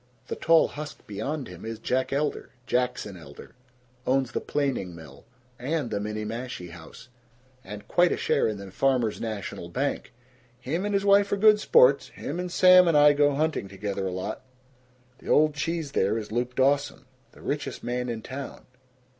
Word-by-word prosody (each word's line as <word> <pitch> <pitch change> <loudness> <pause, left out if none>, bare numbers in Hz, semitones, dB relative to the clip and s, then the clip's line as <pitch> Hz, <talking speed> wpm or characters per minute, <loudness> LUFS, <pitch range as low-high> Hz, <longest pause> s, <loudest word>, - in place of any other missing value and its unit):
The - - -2
tall 165 0 +4
husk 150 0 -8
beyond 130 +8 -4
him 90 -1 -11
is 115 0 -5
Jack 130 +3 -1
Elder 145 +2 -2 0.2
Jackson 125 -5 -1
Elder 70 -5 -13 0.5
owns 130 -1 +1
the - - -2
planing 130 - -2
mill, 80 -4 -13 0.3
and 135 -1 -2
the 100 - -1
Minniemashie 105 -2 -5
House, 85 +8 -13 0.5
and 105 -2 -9
quite 175 +6 +3
a - - 0
share 140 - +1
in 110 -2 -3
the 100 -1 -9
Farmers' 125 0 +1
National 105 -6 -5
Bank. 135 +7 -2 0.5
Him 155 +10 -3
and 205 -1 -1
his 200 0 0
wife 200 0 +5
are 200 - +1
good 215 +1 +6
sports 480 - +5
him 175 - -6
and 180 0 -4
Sam 185 0 +7
and 165 -3 +4
I 145 0 +7
go 145 -1 +3
hunting 155 -8 -1
together 100 0 -4
a - - -3
lot. 90 0 -4 0.8
The - - -10
old 155 0 +4
cheese 160 0 -3
there 105 -3 +1
is 105 -1 -6
Luke 125 +2 -2
Dawson, 140 0 +1 0.3
the - - -16
richest 145 0 -4
man 125 0 -2
in 115 -2 -5
town. 135 +1 -8
130 Hz, 175 wpm, -26 LUFS, 105-150 Hz, 0.8 s, Sam